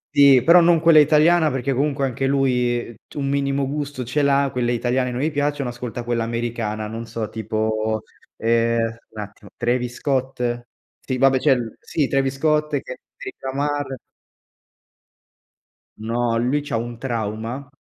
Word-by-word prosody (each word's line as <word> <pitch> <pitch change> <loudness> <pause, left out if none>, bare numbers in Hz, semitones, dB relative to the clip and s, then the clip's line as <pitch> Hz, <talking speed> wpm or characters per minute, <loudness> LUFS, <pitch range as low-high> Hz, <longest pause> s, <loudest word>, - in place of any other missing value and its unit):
Sì, 140 -3 +7
però 170 +5 +7
non 170 -1 +5
quella 165 -1 +6
italiana 155 +2 +5
perché 135 0 -1
comunque 140 +1 0
anche 135 +1 -1
lui, 125 -3 +1
uhm, - - -10
t - - -18
un 140 -1 -2
minimo 140 0 0
gusto 145 -2 -4
ce 130 +5 -1
l'ha, 140 0 +3
quelle 120 -1 0
italiane 125 +1 0
non 125 +1 -3
gli 155 +2 0
piacciono, 145 -2 -1
ascolta 120 0 -6
quella 120 -1 -1
americana, 115 -2 -3
non 115 +2 -6
so 115 -2 -4
tipo, 110 0 -2 0.3
ehm, 115 0 +1
un 110 - -11
attimo, 105 0 -11
Travis 120 0 -1
Scott? 125 -3 -2 0.3
Sì 130 - -3
vabbè 135 0 +4
c'è 140 +1 +4
il 120 -3 -4
sì 145 -4 -1
Travis 135 0 0
Scott, 150 +1 +1
Kandrick - - -10
Lamar. 140 0 -2 2.0
No, 115 +1 -1
lui 130 +5 +1
c'ha 145 - -4
un 120 +1 -3
trauma 115 +2 -4
125 Hz, 155 wpm, -22 LUFS, 115-140 Hz, 2.0 s, Sì